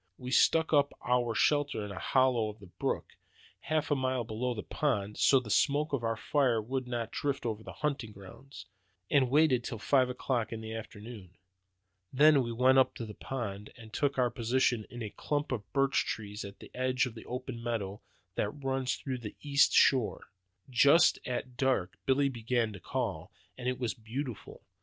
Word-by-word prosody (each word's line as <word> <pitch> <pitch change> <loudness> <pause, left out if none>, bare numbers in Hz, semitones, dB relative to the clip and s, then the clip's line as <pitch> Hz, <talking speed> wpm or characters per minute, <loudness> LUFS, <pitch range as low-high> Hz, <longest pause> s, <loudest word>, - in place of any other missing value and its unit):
We 125 0 -7
stuck 160 +4 +4
up 145 -1 +4
our 120 -2 +1
shelter 145 -7 +1
in 105 - -7
a 95 - -6
hollow 130 -4 +2
on 105 - -9
the 100 - -12
brook, 90 - -4 0.4
half 155 -2 -1
a - - +4
mile 130 -2 0
below 120 +3 -3
the 105 - -5
pond, 105 -9 -1
so 135 - +6
that 130 - 0
the 110 - -9
smoke 145 +4 +2
of 130 -4 0
our 115 -1 -1
fire 130 -3 +2
would 130 +4 -3
not 120 -2 -3
drift 140 -3 -2
over 110 -2 -2
the - - -9
hunting 135 -7 -2
ground, 100 +8 -12 0.5
and 135 -3 +4
waited 140 -3 +4
till 115 - -5
five 130 +3 +2
o'clock 125 -3 -2
in 115 - -4
the 110 0 -6
afternoon. 105 -4 -9 0.8
Then 145 +1 +6
we 120 -2 -3
went 130 +3 +4
up 130 - +2
to 115 - -5
the 105 - -8
pond, 105 -5 -5
and 110 -2 -13
took 140 -2 0
our 125 -2 +2
position 120 -1 +1
in 120 -1 -7
a 105 - -5
clump 145 -1 -2
of 110 -6 -4
birch 135 -1 +2
trees 105 -1 -5
on 100 0 -8
the - - -13
edge 130 0 +1
of 125 - -6
the 110 - -11
open 125 -1 -5
meadow 105 -4 -3 0.3
that 105 - -1
runs 135 0 -2
round 130 -3 -3
the 105 - -7
east 140 -1 +4
shore. 130 -5 +3 0.4
Just 140 +6 +5
at 125 0 -4
dark 130 -10 +1
Billy 135 +1 +3
began 120 -3 -1
to 100 - -9
call, - - -3 0.2
and 125 0 -2
it 125 - -2
was 120 -3 -2
beautiful. 120 +2 -6
125 Hz, 195 wpm, -31 LUFS, 110-135 Hz, 0.8 s, so